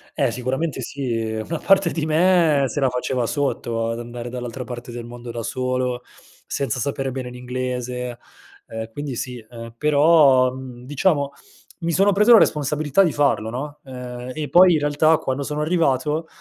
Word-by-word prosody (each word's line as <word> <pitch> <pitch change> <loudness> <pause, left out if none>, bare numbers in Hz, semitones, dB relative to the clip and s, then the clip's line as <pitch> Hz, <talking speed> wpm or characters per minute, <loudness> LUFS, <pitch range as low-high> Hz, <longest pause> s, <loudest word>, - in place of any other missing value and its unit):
Eh, - - +1
sicuramente 135 +4 -2
sì. 130 -1 -4 0.3
Una 165 0 -3
parte 195 -3 +3
di 160 -2 -2
me 160 -3 +3
se 145 - -3
la 135 -2 +3
faceva 125 0 -1
sotto 115 -4 -1
ad 115 - -4
andare 120 0 -7
dall'altra 125 +1 -5
parte 120 0 -7
del 120 0 -7
mondo 120 0 -8
da 115 0 -5
solo, 125 0 -2 0.4
senza 130 -3 -2
sapere 135 +2 -2
bene 130 -1 -5
l'inglese, 125 0 -4 0.5
ehm, 110 0 -6
quindi 145 +1 -5
sì. 125 -1 -5
Ehm, 115 -1 -9
però, 145 -3 +5
mhmm, 130 -2 -9
diciamo 145 0 +1 0.5
mi 170 - 0
sono 195 +4 +4
preso 210 +5 +5
la - - +10
responsabilità 150 +2 +2
di 170 - +2
farlo, 140 -6 +1
no, 145 +5 -6
ehm, 125 -1 -7
e 155 -1 -4
poi 180 0 +7
in 155 - +2
realtà 150 +2 +3
quando 130 0 -3
sono 150 +1 -3
arrivato, 155 -1 0
130 Hz, 170 wpm, -22 LUFS, 125-150 Hz, 0.5 s, la